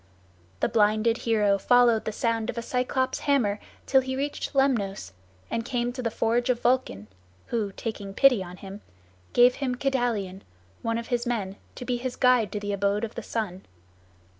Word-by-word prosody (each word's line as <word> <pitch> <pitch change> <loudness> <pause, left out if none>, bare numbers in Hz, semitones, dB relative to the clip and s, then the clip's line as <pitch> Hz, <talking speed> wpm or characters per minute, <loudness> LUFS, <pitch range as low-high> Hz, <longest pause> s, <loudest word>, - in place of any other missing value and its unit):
The - - +3
blinded 215 +1 +2
hero 205 -3 +3
followed 240 0 +4
the - - -1
sound 225 0 -1
of - - -4
a 235 - -2
Cyclops' 260 +1 -1
hammer 230 -8 +1 0.3
till 265 -1 +4
he 260 0 -4
reached 285 +1 -3
Lemnos, 210 - +1 0.4
and 230 - -1
came 245 -1 -2
to 255 - -5
the 235 - 0
forge 230 +2 0
of 245 -2 +2
Vulcan, 245 - 0 0.4
who, 215 -4 -1
taking 200 -3 -6
pity 265 -7 +5
on 180 0 -10
him, 195 +2 -9 0.5
gave 245 +1 +6
him 255 -2 0
Kedalion, 240 -8 -1 0.4
one 230 0 -1
of 230 - -6
his 240 0 -1
men, 200 -5 -2 0.2
to 250 - -7
be 245 -1 0
his 250 +1 -4
guide 250 -5 +3
to 210 - -3
the 205 0 -3
abode 200 +2 0
of 230 - -4
the - - -5
sun. 205 -5 -4
230 Hz, 180 wpm, -26 LUFS, 205-250 Hz, 0.5 s, gave